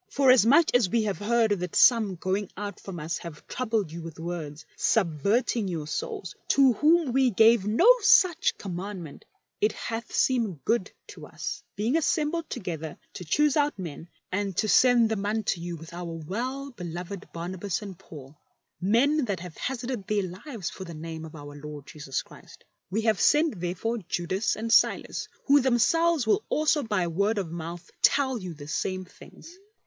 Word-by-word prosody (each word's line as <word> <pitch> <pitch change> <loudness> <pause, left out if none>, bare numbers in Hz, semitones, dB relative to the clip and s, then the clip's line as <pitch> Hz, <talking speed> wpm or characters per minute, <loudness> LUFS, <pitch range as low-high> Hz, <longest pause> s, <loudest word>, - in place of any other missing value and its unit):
" - - -45
Forasmuch 265 +3 +5
as 245 -6 +4
we 230 +1 +1
have 205 -2 -2
heard 225 +1 +2
that 180 -1 -5
some 220 -6 +5
going 190 +3 -2
out 205 0 -5
from 185 -3 -8
us 160 +3 -3
have 165 -3 -10
troubled 220 -8 -1
you 170 +1 -7
with 165 -1 -9
words, 160 -2 -6
subverting 205 - +1
your 165 -5 -3
souls, 165 +4 -4
to 270 -3 +5
whom 305 +2 +3
we 265 -1 +4
gave 225 -1 +4
no 230 - +3 0.7
commandment; 180 -4 -7 0.4
it 210 0 +3
hath 230 0 -5
seemed 220 - 0
good 230 -5 +1
to - - -11
us, - - -5
being 225 +7 0
assembled 320 0 0
together 160 -4 -5 0.2
to - - -7
choose 290 - +2
out 295 -4 +1
men, 170 -2 -7 0.2
and 195 -1 -2
to 215 - +1
send 245 +1 +5
them 220 -2 -2
unto 205 -4 -1
you 175 0 -4
with 165 +1 -11
our 175 -1 -5 0.2
well 260 - -3
beloved 175 -2 -7
Barnabas 180 +3 -4
and 195 -2 -8
Paid, 140 -3 -12 0.5
men 265 - +3
thai 200 - 0
have 175 -3 -9
hazarded 245 -5 -4
their 210 -1 +1
lives 190 - -6
for 190 - -8
the 170 -3 -8
name 160 0 -7
of 160 - -11
Our 145 -1 -10
Lord 145 -1 -9
Jesus 140 -4 -4
Christ. - - -16 0.3
We 210 +5 -1
have 220 -4 +1
sent 300 - +3
therefore 185 +7 -2
Judas 185 +5 -1
and 225 +1 -1
Silas, - - +2 0.2
who 285 0 +5
themselves 270 +5 +3
will 305 - +2
also 305 0 +2
by 205 -7 0
word 200 +6 0
of 185 -5 -3
mouth 170 +1 -7
tell 265 -3 +3
jmu 180 -5 -7
the 145 -1 -10
same 185 +4 -2
things. 340 - -15
200 Hz, 175 wpm, -27 LUFS, 170-240 Hz, 0.7 s, Forasmuch